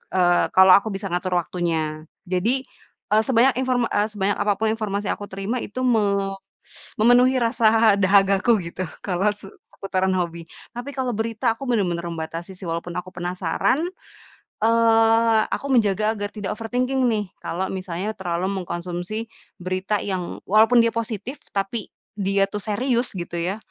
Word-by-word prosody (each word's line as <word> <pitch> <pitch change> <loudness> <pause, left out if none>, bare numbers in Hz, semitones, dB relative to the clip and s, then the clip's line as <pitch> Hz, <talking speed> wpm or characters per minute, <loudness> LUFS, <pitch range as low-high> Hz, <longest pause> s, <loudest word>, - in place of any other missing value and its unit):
eee, 175 -1 +4
kalau 190 0 +8
aku 200 +2 +5
bisa 195 -1 -5
ngatur 180 +1 -1
waktunya. 160 -3 -2 0.2
Jadi, 205 +9 0 0.5
eee, 215 +1 +5
sebanyak 255 +1 +3
inform 250 -2 0
eee, 205 +1 +2
sebanyak 205 -2 -1
apapun 215 +1 +1
informasi 205 -2 -2
yang - - -4
aku 205 - -7
terima 195 +6 -3
itu 255 +4 -5
me 200 -5 +2 0.3
s - - -13
memenuhi 245 +4 +5
rasa 225 -3 +4
dahagaku, 195 +3 +4 0.2
gitu, 185 0 -4 0.2
kalau 190 +1 0
se 195 -1 -13 0.2
seputaran 190 -1 -1
hobi. 170 -2 -3 0.3
Tapi, 245 +3 -6
kalau 255 -2 0
berita 225 +2 0
aku 260 +4 -8
bener-bener 180 -7 0
membatasi 165 +2 -6
sih 190 - -12
walaupun 170 +1 -4
aku 185 +1 -5
penasaran, 180 - -1 0.8
eee, 225 0 +4
aku - - -3
menjaga 215 -2 +2
agar 205 0 -4
tidak 205 -3 -4
overthinking 250 +4 -1
nih, 215 -2 0 0.2
kalau 185 +3 -2
misalnya 185 +2 -4
terlalu 180 0 -2
mengkonsumsi 175 +5 -4 0.3
berita 185 +3 -1
yang 185 -3 -4
walaupun 220 +4 +5
dia 230 0 +3
positif, 230 +3 -4
tapi 200 +3 -3 0.3
dia 195 -1 +1
tuh 205 0 -5
serius 240 +3 0
gitu 175 -1 -5
ya, 185 +4 -2
205 Hz, 150 wpm, -23 LUFS, 185-225 Hz, 0.8 s, kalau